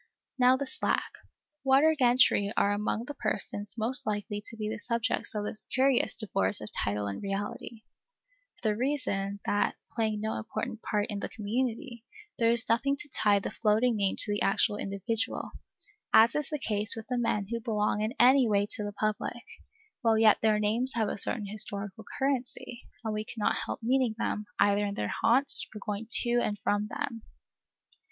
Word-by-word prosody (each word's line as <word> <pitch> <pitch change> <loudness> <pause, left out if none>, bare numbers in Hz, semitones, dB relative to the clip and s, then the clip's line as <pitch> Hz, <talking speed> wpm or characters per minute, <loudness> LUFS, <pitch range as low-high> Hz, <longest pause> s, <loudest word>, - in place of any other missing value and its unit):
Now 250 +1 +5
the 280 - -3
slack 260 - -1 0.5
water 275 +4 +5
gentry 245 -6 +3
are 200 - +3
among 210 +2 -2
the 290 - -6
persons 210 -4 -2
most 230 +2 -1
likely 205 0 -3
to 225 - -10
be 215 -1 -3
the 220 +1 -4
subjects 235 -1 -1
of 210 - -2
this 215 - -5
curious 260 -1 +2
divorce 100 - -1
of 105 - -9
title 105 0 -1
and 100 -1 -5
reality, 205 +3 -5 0.7
for 225 - -4
the 210 - 0
reason, 205 -6 -2
that, 205 0 +1 0.2
playing 220 -2 -1
no 220 +1 -2
important 220 0 -5
part 210 -2 -1
in 205 - -3
the - - -4
community, 235 +2 -3 0.4
there 230 -1 +3
is 235 -1 +3
nothing 275 +5 +1
to 295 0 -7
tie 210 -5 +2
the 200 - -3
floating 225 +2 +2
name 200 -2 0
to 210 - +5
the 205 - -2
actual 205 +1 +2
individual, 200 +3 -3 0.6
as 225 +1 +6
is 300 -2 -2
the 305 - -2
case 210 -5 +2
with 225 -1 -7
the 250 -1 -1
men 210 -4 -1
who 235 - -1
belong 210 -2 -1
in 220 +5 -2
any 255 +1 +6
way 205 -1 +2
to 210 - +1
the 205 0 -5
public, 215 +3 -3 0.6
while 225 -3 +3
yet 220 -1 +5
their 215 -1 +3
names 225 +5 0
have 220 -3 0
a - - -4
certain 215 0 0
historical 200 0 -1
currency, 260 -2 -3 0.2
and 220 - -1
we 215 0 -2
cannot 215 -1 -1
help - - -5
meeting 250 -1 +1
them, 210 -2 -3
either 205 0 +3
in 200 -1 -3
their 105 -1 -3
haunts, 270 +4 +5
or - - -6
going 210 +1 -4
to 240 0 +5
and 205 -3 -2
from 205 +1 0
them. 235 -2 -5
220 Hz, 185 wpm, -29 LUFS, 205-240 Hz, 0.7 s, as